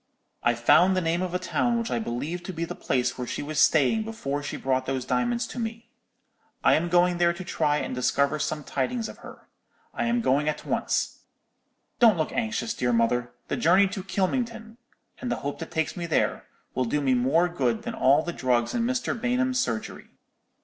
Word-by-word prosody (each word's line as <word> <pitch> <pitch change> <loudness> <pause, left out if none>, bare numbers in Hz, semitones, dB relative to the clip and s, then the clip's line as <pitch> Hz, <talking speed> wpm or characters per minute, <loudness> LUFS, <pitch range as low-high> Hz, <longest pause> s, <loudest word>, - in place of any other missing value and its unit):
"'I've 120 -1 +1
found 180 +10 +5
the - - +4
name 170 0 0
of 180 -1 -2
a - - +4
town 235 +6 0
which 230 0 -3
I - - 0
believe 160 - -3
to - - -4
be 170 -1 -3
the - - -6
place 125 -1 -1
where 125 - -3
she - - -4
was 150 0 -3
staying 160 - +4
before 215 -11 -3
she 145 - -5
brought 130 -1 -1
those 130 -2 -2
diamonds 235 - 0
to 245 - -7
me. 230 +1 -5 0.7
I - - +5
am 170 +2 +1
going 175 0 +3
there 170 0 +4
to 180 +2 -7
try 150 -4 0
and - - -3
discover 140 +4 +1
some 150 +1 -2
tidings 220 - -2
of - - -11
her. - - -13 0.5
I - - -1
am 235 0 +1
going 150 - +2
at 150 - -4
once. - - -1 0.8
Don't 225 -6 +6
look 155 - -1
anxious, 230 -1 -2
dear 125 -1 0
mother; 120 +1 +1 0.2
the - - -2
journey 185 +5 +5
to 200 0 -5
Kylmington, 225 +3 -2 0.4
and 245 - -3
the - - +1
hope 140 - -3
that 165 - -6
takes 160 -2 -1
me 170 -1 -4
there, 160 - 0 0.3
will 130 - 0
do 150 +5 0
me 135 -2 +2
more 135 +8 +3
good 130 -10 -1
than - - -4
all 140 +4 +4
the 175 - -4
drugs 125 -4 0
in 240 - 0
Mr. 250 +1 0
Bainham's 255 +1 0
surgery. 115 - -3
170 Hz, 205 wpm, -26 LUFS, 135-225 Hz, 0.8 s, Don't